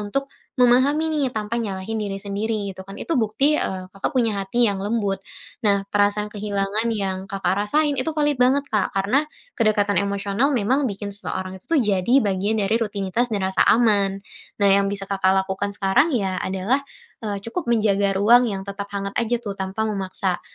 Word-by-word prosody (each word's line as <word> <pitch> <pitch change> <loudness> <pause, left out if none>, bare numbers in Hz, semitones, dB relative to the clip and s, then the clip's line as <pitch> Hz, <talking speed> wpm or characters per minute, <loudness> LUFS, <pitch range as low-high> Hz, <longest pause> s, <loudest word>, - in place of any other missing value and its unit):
untuk 210 +7 -2 0.4
memahami 275 +6 +4
nih, 295 -3 +1
tanpa 215 +1 -3
nyalahin 200 +1 -4
diri 200 -2 -3
sendiri 205 +1 -2
gitu - - -10
kan, 195 +1 -10
itu 335 - -3
bukti, 250 +6 +2
eee, 185 -1 -4
Kakak 195 +9 -3
punya 225 -5 +1
hati 235 +5 +1
yang 200 - -1
lembut. 205 -3 -1 0.4
Nah 200 -1 +3
perasaan 205 +1 +1
kehilangan 205 +1 -1
yang 190 -3 -2
Kakak 195 0 -1
rasain, 295 +7 +1
itu 255 +5 -1
valid 295 -2 +1
banget 265 +3 +4
Kak, 210 -3 +2
karena, 205 +10 +1 0.3
kedekatan 210 -3 +2
emosional 200 +5 0
memang 260 +4 +1
bikin 200 0 -5
seseorang 190 -2 -5
itu - - -35
tuh 330 -3 +3
jadi 210 +4 +3
bagian 200 +2 0
dari 205 +3 +1
rutinitas 210 +2 -1
dan 205 - 0
rasa 190 - +3
aman. 200 -4 +3 0.4
Nah, 200 - +5
yang 195 0 +4
bisa 200 -1 -4
Kakak 190 -1 +2
lakukan 195 +1 -3
sekarang, 195 +11 +3
ya, 190 -4 -1
adalah, 195 +8 0 0.4
eee, 205 -1 -2
cukup 235 +5 -4
menjaga 205 -4 +2
ruang 235 +5 +5
yang 195 -2 -4
tetap 200 0 -6
hangat 200 0 -3
aja 235 +1 0
tuh, 210 -4 -5
tanpa 190 +3 -3
memaksa. 190 -3 -2
205 Hz, 180 wpm, -22 LUFS, 195-235 Hz, 0.4 s, Nah